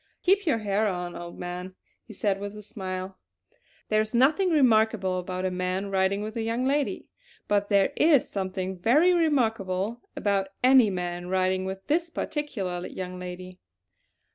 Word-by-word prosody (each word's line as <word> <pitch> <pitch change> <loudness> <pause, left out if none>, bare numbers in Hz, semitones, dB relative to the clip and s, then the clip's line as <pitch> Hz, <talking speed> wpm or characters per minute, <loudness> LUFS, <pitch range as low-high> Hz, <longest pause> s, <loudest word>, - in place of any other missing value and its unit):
"Keep 395 0 +3
your 300 - +3
hair 210 0 0
on, 180 -2 -3
old 175 0 -8
man!" 180 +1 -6 0.3
he - - -13
said 195 -1 -1
with 205 +1 -6
a 210 - -9
smile. 190 -3 -6 0.7
"There 215 0 +3
is 215 +2 -3
nothing 305 +10 +4
remarkable 220 - +3
about 185 +1 -4
a 185 - 0
man 185 +2 -2
riding 195 +1 +1
with 215 +2 -6
a 230 - -2
young 230 +3 -1
lady; 285 +1 0 0.4
but 205 0 +1
there 200 +5 +3
is 300 -4 +4
something 190 -1 -4
very 300 - +4
remarkable 225 - 0
about 200 -2 0 0.2
any 255 -3 +6
man 175 -1 -4
riding 185 0 +1
with 190 0 -6
this 335 +3 0
particular 200 - -3
young 185 -1 -6
lady. 180 0 -8
200 Hz, 160 wpm, -26 LUFS, 185-235 Hz, 0.7 s, any